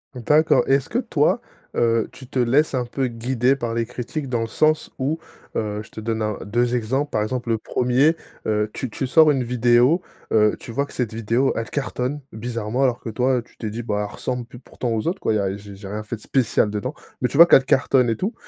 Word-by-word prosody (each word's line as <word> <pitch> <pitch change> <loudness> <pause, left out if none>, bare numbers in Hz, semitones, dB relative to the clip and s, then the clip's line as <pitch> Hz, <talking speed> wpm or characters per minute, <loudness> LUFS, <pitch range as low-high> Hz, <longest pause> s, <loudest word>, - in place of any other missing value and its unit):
D'accord. 150 +6 +3
Et, - - +4
est-ce 140 - -2
que - - -1
toi, - - +1 0.4
heu, 115 -1 +2
tu 130 - -12
te 135 - -6
laisses 130 +6 +3
un 125 - +1
peu 130 +2 -2
guider 125 +2 +1
par 120 -4 -3
les 115 0 0
critiques? 125 +5 -5
Dans 120 -3 -1
le 115 - -2
sens 155 +7 +1
où, 145 +5 -1 0.4
heu, 105 -1 -2
je - - -16
te 110 - -8
donne 110 0 -2
1-2 110 +3 0
exemples. 130 +5 -1
Par 105 - 0
exemple, 120 +2 -3
le 115 - +2
1er, 125 +8 +2 0.3
heu, 105 0 0
tu 130 - -4
tu 130 +4 -3
sors 155 +3 +6
une 135 -3 0
vidéo, 120 +6 +3 0.3
heu, 105 -1 +4
tu - - -9
vois 140 +4 0
que - - -16
cette 120 -4 -2
vidéo 115 +4 +1
elle 115 -1 -3
cartonne, 140 0 -2
bizarrement 115 +2 -2
alors 125 -2 +2
que - - -6
toi, 125 +4 +1
heu, - - -1
tu 120 - -22
t'es 110 - -5
dit: 115 +3 -5
«Bah, 105 -2 -1
elle - - -13
ressemble 125 -1 -3
pl, 120 0 -13
pourtant 125 -1 -5
aux 110 +3 -1
autres 185 +3 -2
quoi, - - +1
y'a, 100 -2 0
j'ai 100 0 -11
j'ai 100 0 -9
rien 105 +2 -4
fait 110 +2 -5
de - - -19
spécial 125 -5 +1
dedans». 105 +6 -3 0.3
Mais 125 - +1
tu - - -3
vois 170 - +11
qu'elle 135 -6 +6
cartonne 130 -2 +3
et 115 - 0
tout. 200 +6 -2
120 Hz, 240 wpm, -22 LUFS, 110-135 Hz, 0.4 s, vois